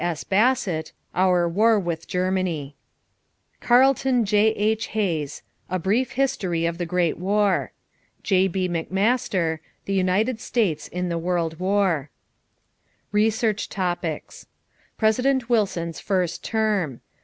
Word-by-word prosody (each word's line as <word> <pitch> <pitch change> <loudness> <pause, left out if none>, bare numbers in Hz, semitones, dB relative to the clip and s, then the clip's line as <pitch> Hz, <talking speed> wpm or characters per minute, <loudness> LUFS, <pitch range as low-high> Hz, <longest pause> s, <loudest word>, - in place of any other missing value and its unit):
S. 170 -3 -2
Bassett, 195 -7 +1 0.2
Our 180 -1 +3
War 215 +5 +3
with 170 -3 -4
Germany. 180 -6 -1 0.8
Carlton 255 -1 +3
J.H. 215 +1 +2
Hayes, 165 -9 -2 0.3
A 185 - 0
Brief 210 +8 0
History 195 -11 0
of 170 +1 -2
the 175 - -2
Great 175 -2 0
War. 200 +1 +1 0.5
J.B. 190 -1 +1
McMaster, 180 -1 0 0.3
The 195 - -2
United 195 +6 +1
States 205 -11 -1
in 180 0 -3
the 170 -1 -1
World 165 -2 -1
War. 185 -6 +1 1.0
=Research 215 0 +1
Topics= 175 -4 -4 0.5
=President 250 +3 +1
Wilson's 180 -7 0
First 185 -4 -1
Term. 210 - -1
190 Hz, 110 wpm, -23 LUFS, 170-220 Hz, 1.0 s, Our